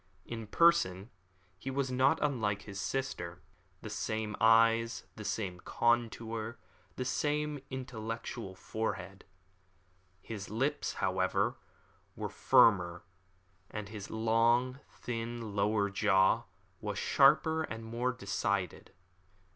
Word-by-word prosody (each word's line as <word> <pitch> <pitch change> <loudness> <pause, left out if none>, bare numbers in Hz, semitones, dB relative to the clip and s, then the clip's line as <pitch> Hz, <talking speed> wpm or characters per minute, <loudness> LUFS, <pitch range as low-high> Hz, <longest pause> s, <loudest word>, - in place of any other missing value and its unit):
In 115 -2 -6
person 120 - +3 0.5
he 135 - -5
was 135 -1 -1
not 130 +5 +4
unlike 110 -8 0
his 100 -1 -6
sister. 110 -11 -3 0.4
The - - -5
same 110 -1 -2
eyes, 115 +1 +4
the 110 - -8
same 95 -4 -3
contour, 115 0 0 0.4
the 125 - -3
same 150 +3 0
intellectual 115 -5 -5
forehead. 100 -2 -4 0.9
His 100 0 -7
lips, 135 +8 -1
however, 95 0 0 0.6
were - - -4
firmer, 90 -5 +4 0.7
and 105 -2 -6
his 105 -2 -7
long, 115 +3 +2
thin, 115 -2 -5
lower 100 0 +2
jaw 95 -2 +3 0.3
was - - -4
sharper 160 0 +4
and 115 -7 -5
more 120 +3 -1
decided. 100 -4 -2
115 Hz, 105 wpm, -32 LUFS, 100-125 Hz, 0.9 s, not